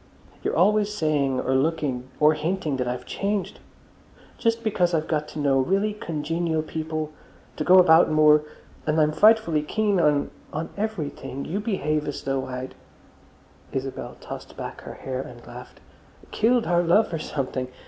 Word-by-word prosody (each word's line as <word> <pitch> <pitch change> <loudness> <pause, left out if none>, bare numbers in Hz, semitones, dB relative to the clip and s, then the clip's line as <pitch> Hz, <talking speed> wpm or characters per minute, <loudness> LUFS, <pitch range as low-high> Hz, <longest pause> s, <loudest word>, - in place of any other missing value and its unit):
You're - - -1
always 210 +4 +3
saying 145 -8 0
or 130 - 0
looking 135 -3 0
or 150 0 +6
hinting 155 -2 -2
that 125 -1 -2
I've 125 0 -4
changed. 200 -2 -2 0.8
Just 230 0 +1
because 180 -6 +1
I've 155 -1 -1
got 150 -2 -1
to 155 - -7
know 140 -2 +3
really 195 +9 +1
congenial 165 -2 -2
people, 155 -1 -4 0.4
and 150 - -4
go 185 - +8
about 165 -3 +7
more, 150 -1 +5 0.5
and 155 +1 +1
am 155 0 +4
frightfully 210 -3 +4
keen 205 +5 0
on—on 150 +1 -1
everything, 150 -10 -4
you 195 - -2
behave 155 -8 -1
as 145 - -5
though 135 -1 -2
I'd—" 130 0 -6 1.0
Isabel 135 0 -5
tossed - - -9
back - - -6
her - - -9
hair 130 -1 -4
and 120 -2 -11
laughed—"killed 220 - -3
our 175 0 +3
love 175 +3 +3
or 165 - -1
something. 130 -4 -3
155 Hz, 150 wpm, -24 LUFS, 140-185 Hz, 1.0 s, go